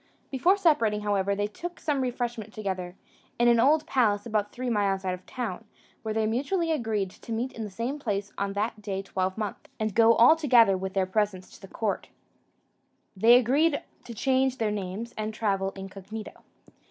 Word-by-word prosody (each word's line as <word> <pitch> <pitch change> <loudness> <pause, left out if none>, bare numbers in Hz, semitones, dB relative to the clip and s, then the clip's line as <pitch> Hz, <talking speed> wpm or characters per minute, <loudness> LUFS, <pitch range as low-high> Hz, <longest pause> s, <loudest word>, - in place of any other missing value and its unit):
Before 345 +9 +3
separating, 265 - +2
however, 200 -1 0
they 205 +1 0
took 350 +12 -7
some 290 -3 0
refreshment 240 -3 -3
together, 185 -4 -4 0.4
in 240 - +3
an 235 -1 +5
old 300 +5 +4
palace 215 -9 +1
about 215 -3 -1
three 255 +1 -5
miles 200 -4 0
out 185 - 0
of 180 0 -8
town, 230 -5 -4 0.4
where 220 - -4
they 220 0 +1
mutually 290 - 0
agreed 220 -9 -1
to 230 - -12
meet 235 +4 -2
in 225 - -5
the - - -6
same 235 +9 -4
place 200 -5 -3
on 200 0 -2
that 210 +2 -2
day 195 -2 -3
twelvemonth, 190 +2 -3
and 215 -2 -1
go 230 +2 +6
all 240 +8 +7
together 240 -10 +5
with 190 +1 -5
their 190 -1 +2
presents 190 -1 -2
to 195 - -11
court. 205 +1 -3 1.1
They 225 +5 +6
also 250 - +8
agreed 285 +6 +2 0.2
to 235 - -8
change 265 +2 +1
their 220 -2 0
names, 210 +3 -5
and 215 0 -3
travel 195 -3 0
incognito. 195 +3 -8
220 Hz, 180 wpm, -27 LUFS, 200-245 Hz, 1.1 s, also